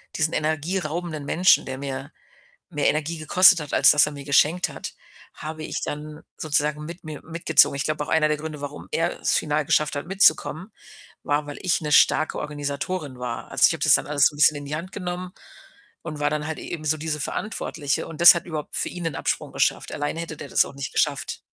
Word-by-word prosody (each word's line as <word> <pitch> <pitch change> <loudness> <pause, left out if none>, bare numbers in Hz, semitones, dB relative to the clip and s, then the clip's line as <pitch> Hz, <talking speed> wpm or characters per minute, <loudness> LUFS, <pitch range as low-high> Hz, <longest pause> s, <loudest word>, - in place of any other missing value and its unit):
diesen 160 0 0
energieraubenden 155 0 -3
Menschen- 180 +5 +3
der 130 0 -6
mir 135 +2 -6 0.6
mehr 150 -3 0
Energie 155 +2 -1
gekostet 185 +3 +5
hat, 145 - -8
als - - +7
dass 150 0 +5
er 150 - -5
mir 140 -1 -9
geschenkt 150 +5 +2
hat- - - -8 0.4
habe 155 +1 -7
ich - - -5
dann 150 +1 -6
sozusagen 150 0 -1
mit 170 +3 -9
mir 155 -2 -8
mitgezogen. 160 -3 +3
Ich 140 - -2
glaube 150 -1 -2
auch - - -14
einer 155 -1 +2
der 150 - 0
Gründe, 150 -1 -7
warum 145 0 -8
er 165 +1 -1
es - - +1
final 150 0 0
geschafft 150 0 +1
hat 145 - -5
mitzukommen, 190 +1 +2 0.5
war, 145 +1 0
weil 145 - -8
ich 180 -3 0
'ne 150 -1 -4
starke 155 +1 +3
Organisatorin 145 0 -4
war. 125 -1 -6
Also, - - +2
ich - - +2
habe - - -6
das - - +6
dann - - +2
alles 145 -1 +3
so 150 - +1
'n - - -12
bisschen 150 0 +5
in 145 - -7
die 150 +2 -4
Hand 180 +4 -7
genommen 180 0 -5 0.7
und 155 -3 -7
war 145 0 +1
dann 150 0 -3
halt 160 - -5
eben 155 -3 -7
so 155 +1 +1
diese 155 -1 -3
Verantwortliche 150 -7 -3
und 165 0 -10
das 175 - +10
hat 170 - -4
überhaupt 155 -3 -4
für - - +1
ihn 180 - -8
den 160 -4 -3
Absprung - - -2
geschafft. - - 0
Alleine 145 +3 -3
hätte 165 -2 -6
der 145 - -9
das - - +3
auch - - -11
nicht 140 -1 -6
geschafft. - - -1
155 Hz, 220 wpm, -23 LUFS, 145-165 Hz, 0.7 s, das